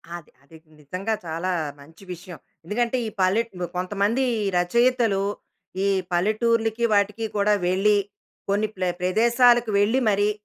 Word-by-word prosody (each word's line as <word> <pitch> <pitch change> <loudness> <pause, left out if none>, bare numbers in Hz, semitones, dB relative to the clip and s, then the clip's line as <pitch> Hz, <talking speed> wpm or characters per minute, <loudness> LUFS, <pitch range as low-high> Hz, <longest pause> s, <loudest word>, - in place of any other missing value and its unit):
అది. 170 -3 -11
అది. 160 +3 -16 0.2
నిజంగా 185 +9 -4
చాలా 165 +3 -3 0.3
మంచి 160 +6 -16
విషయం. 175 0 -11 0.3
ఎందుకంటే 235 +7 -1
ఈ - - -3
పల్లె 190 +5 +3 0.4
కొంతమంది 205 +7 0 0.3
రచయితలు. 230 +1 +2 0.6
ఈ - - +2 0.2
పల్లెటూర్లకి 225 +4 +1
వాటికి 205 +2 +1
కూడా 205 +1 +3
వెళ్లి 200 +3 +3 0.5
కొన్ని 210 +2 +1
ప్ల 185 - -4 0.2
ప్రదేశాలకు 235 +4 +3
వెళ్లి 225 +6 +2
మరీ 205 +1 +2
205 Hz, 120 wpm, -23 LUFS, 185-230 Hz, 0.6 s, పల్లె